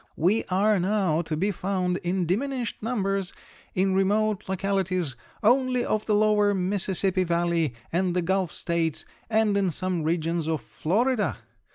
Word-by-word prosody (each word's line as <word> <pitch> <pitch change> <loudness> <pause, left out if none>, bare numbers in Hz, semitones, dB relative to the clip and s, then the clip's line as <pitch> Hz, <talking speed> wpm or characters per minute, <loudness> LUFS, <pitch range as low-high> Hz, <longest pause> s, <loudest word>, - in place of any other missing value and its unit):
We 190 +8 +2
are 200 +2 +2
now 185 -4 +1
to 160 -2 -3
be 195 +6 +1
found, 185 -1 -1
in 180 -1 -1
diminished 245 - -2
numbers, 195 -4 -1 0.4
in 190 0 +2
remote 205 +1 +1
localities 190 -6 -1 0.3
only 250 +2 +3
of 215 0 -1
the 210 - +3
lower 210 -1 +3
Mississippi 190 0 0
Valley 170 -5 0 0.2
and 180 0 +1
the 180 - +1
Gulf 190 -1 0
States 165 -3 -1 0.2
and 220 -2 +2
in 195 -2 +2
some 185 +1 -2
regions 165 0 -1
of 160 -2 0
Florida. 220 +7 0
190 Hz, 145 wpm, -26 LUFS, 175-210 Hz, 0.4 s, only